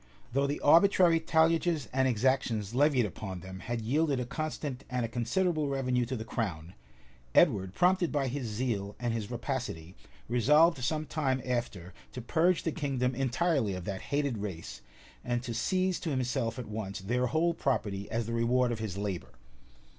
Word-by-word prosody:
Though 140 +1 +2
the 145 - -2
arbitrary 170 +1 +5
talliages 160 -2 +2
and 130 0 +3
exactions 120 -3 0
levied 135 -2 +3
upon 95 -2 -6
them 95 +1 -8
had 120 +2 -3
yielded 140 +3 +1
a 125 - -2
constant 145 -1 -4
and 125 -2 -1
a - - -2
considerable 150 +7 0
revenue 130 -3 0
to 130 - -3
the 110 -2 -5
crown, 90 -8 -4 0.6
Edward 100 - +4
prompted 180 -1 +3
by 140 -2 0
his 130 -1 -3
zeal 105 -3 -2
and 120 -2 -1
his 110 -3 -3
rapacity, 120 - -4 0.3
resolved 145 +5 +4
some 155 +4 -1
time 135 -5 0
after[*] 115 -8 -3 0.2
to - - -5
purge 170 +7 +2
the 165 - 0
kingdom 135 -5 -1
entirely 135 - 0
of 90 -1 -6
that 95 -2 -4
hated 140 -5 -1
race, 95 -5 -6 0.4
and 120 0 -1
to 120 -1 -4
seize 185 - 0
to 165 - -3
himself 130 -3 -1
at 125 - -5
once 105 -3 -5
their 125 +6 0
whole 160 +5 +1
property 105 -9 -2
as 115 0 -1
the 115 - -4
reward 120 +2 +2
of 115 - -3
his 105 -4 -4
labor. 95 -11 -4
125 Hz, 170 wpm, -30 LUFS, 110-145 Hz, 0.6 s, arbitrary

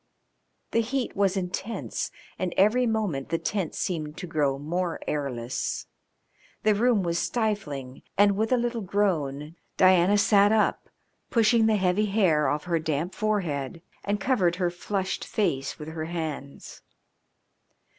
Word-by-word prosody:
The 230 - +3
heat 245 +2 -2
was 195 -1 +2
intense 190 +4 -3 0.3
and 185 -2 -2
every 235 +6 +4
moment 210 -12 -1
the 165 - +1
tent 190 -2 -2
seemed 155 -4 -3
to 180 - -5
grow 150 -5 0
more 170 +4 -2
airless. 130 -4 -2 0.8
The 215 - +4
room 225 -1 +2
was 170 -1 0
stifling, 150 - -2 0.2
and, 200 0 +5
with 220 +3 0
a 255 - +5
little 240 -1 -1
groan, 165 -6 -1 0.2
Diana 185 +2 +5
sat 205 0 +5
up, 220 -1 +1 0.4
pushing 225 -1 +4
the 220 - +3
heavy 190 +2 +2
hair 180 -8 +3
oft 150 +3 -1
her 170 -2 +1
damp 160 +3 -2
forehead, 165 -8 -2 0.2
and 205 0 -1
covered 190 -6 +2
her 180 -1 0
flushed 190 +2 -3
face 150 -10 -1
with 150 0 -7
her 160 0 -4
hands. 160 -4 -6
185 Hz, 140 wpm, -26 LUFS, 155-210 Hz, 0.8 s, and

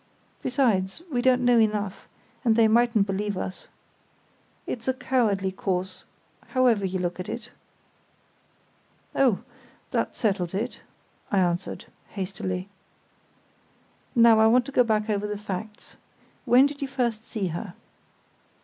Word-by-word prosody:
Besides, 240 - 0
we 245 -3 +1
don't 250 -1 +3
know 245 -1 +5
enough, 210 -3 0 0.4
and 230 -3 +3
they 225 -1 +5
mightn't 230 -2 +3
believe 200 0 -2
us. 185 0 -6 1.0
It's 240 0 -5
a 260 - +1
cowardly 215 -8 +1
course, 185 -1 -3 0.5
however 240 -5 +4
you 185 0 -2
look 180 0 -3
at 185 +3 -5
it." 235 0 -6 1.6
"Oh! 255 -8 +2 0.5
that - - -1
settles 190 -5 0
it," 230 +5 -3 0.5
I 200 - +2
answered, 180 -1 0 0.2
hastily. 185 -1 -4 1.5
"Now 230 -2 +7
I 220 - +6
want 245 +2 +4
to 275 - -7
go 250 - +4
back 215 -2 0
over 210 -1 -1
the 210 0 -3
facts. 210 +1 -7 0.5
When 250 +3 +6
did 285 0 -4
you 275 - -1
first 240 -5 -2
see 200 -5 -2
her?" 175 +3 -6
215 Hz, 130 wpm, -26 LUFS, 190-245 Hz, 1.6 s, Now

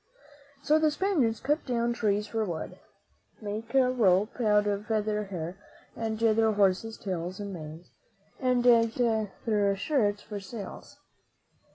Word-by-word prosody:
So 305 +2 +4
the 310 -1 +3
Spaniards 300 - +1
cut 295 +4 0
down 235 -1 0
trees 210 -3 0
for 225 0 -2
wood, 170 -6 -5 0.6
made 215 +2 -5
rope 245 -5 +2
out 210 -2 +3
of 205 0 -2
the 215 -1 0
hair 175 0 -5 0.4
of 220 -1 -3
their 225 0 +3
horses' 205 +2 +1
tails 185 -1 -4
and 200 -1 -5
manes, 160 0 -9 0.5
and 250 -1 +1
used 230 -2 +4
their 215 -3 0
shirts 205 -2 0
for 205 -1 -6
sails. 200 +1 -9
215 Hz, 135 wpm, -28 LUFS, 200-235 Hz, 0.6 s, So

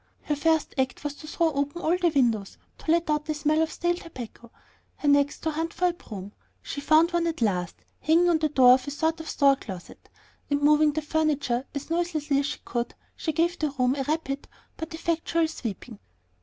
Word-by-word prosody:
Her 295 - -1
first 320 +1 +1
act 260 +1 -1
was 295 -1 -2
to 305 - -11
throw 325 0 +1
open 285 +4 -2
all 345 -1 +2
the 360 -1 +2
windows 235 -9 +1 0.2
to - - -8
let 335 +1 +3
out 300 -1 0
the 310 - -2
smell 305 +1 +2
of 320 -1 0
stale 345 0 0
tobacco, 245 -8 -10 0.5
her 295 - -4
next 285 0 +3
to 320 - -1
hunt 325 +2 -3
for 360 0 +2
a - - -2
broom. 205 - -9 0.3
She 285 - -5
found 315 +3 +4
one 340 -1 +1
at 330 - -2
last, 180 -5 0 0.2
hanging 335 +3 +3
on 335 -2 +3
the 310 0 +1
door 260 -3 +6
of 255 +1 +1
a - - -1
sort 320 +3 -1
of 320 - -7
store 275 -1 +4
closet, 190 -8 -10 0.4
and 285 0 0
moving 300 0 +5
the 310 0 -2
furniture 290 -5 0
as 285 +3 -5
noiselessly 315 -5 0
as 280 - 0
she 295 - -4
could, 240 -1 -3 0.2
she 320 - -2
gave 340 +3 0
the 305 - +1
room 255 -2 +1
a 275 - -2
rapid 290 -2 -2 0.3
but 320 0 -6
effectual 330 0 0
sweeping. 230 -6 -7
300 Hz, 210 wpm, -26 LUFS, 275-325 Hz, 0.5 s, door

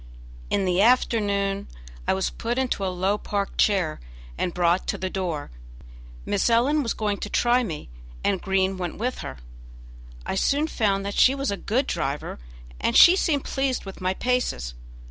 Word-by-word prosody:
In 195 - +1
the 180 +1 +2
afternoon 200 -4 +2 0.4
I - - +3
was 190 - -1
put 235 +2 -3
into 255 -6 -1
a - - 0
low 185 +3 0
park 200 -1 -3
chair 190 -7 +2 0.4
and 175 - -1
brought 175 +1 +1
to - - -1
the 185 0 -3
door. 170 - -3 0.7
Miss 200 - +1
Ellen 260 +6 +3
was 235 -5 -2
going 210 -2 -1
to 205 - -5
try 245 +3 +3
me, 165 - -5 0.4
and 195 -2 +1
Green 190 0 +1
went 175 -2 -4
with 250 +4 -2
her. 65 - -6 0.9
I - - -2
soon 285 +10 +2
found 200 -9 0
that 200 - -3
she 260 +6 +5
was 275 -4 -1
a - - -1
good 245 +7 0
driver, 145 - -3 0.4
and - - +2
she 350 - +9
seemed 305 -7 +1
pleased 270 -4 -1
with 195 0 -9
my 185 +1 0
paces. 250 - -1
200 Hz, 175 wpm, -25 LUFS, 185-245 Hz, 0.9 s, she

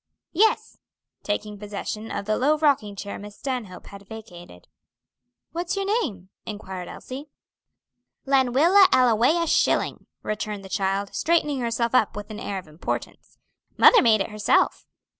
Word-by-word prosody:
"Yes," 430 +6 +1 0.4
taking 210 0 -3
possession 210 +1 -5
of - - -4
the 215 +1 +1
low 295 +6 +2
rocking 275 -10 +1
chair 200 0 -6
Miss 205 0 -11
Stanhope 245 -9 -5
had 200 0 -12
vacated. 175 - -12 0.8
"What's 345 +3 -3
your 395 0 -2 0.2
name?" 190 - -6
inquired 190 -4 -7
Elsie. 275 +3 -8 1.0
"Lenwilla 275 +9 +5
Ellawea 255 - +4
Schilling," - - +1 0.2
returned 210 -1 -4
the - - -10
child, 195 0 -1
straightening 300 -4 +1
herself 235 0 -1
up 255 -5 +3
with 210 +1 -7
an 215 - -7
air 200 -3 -4
of 185 - -8
importance; 155 +2 -6 0.4
"mother - - +8
made 220 -4 +4
it 195 - -3
herself." 210 -1 +1
215 Hz, 140 wpm, -24 LUFS, 200-270 Hz, 1.0 s, mother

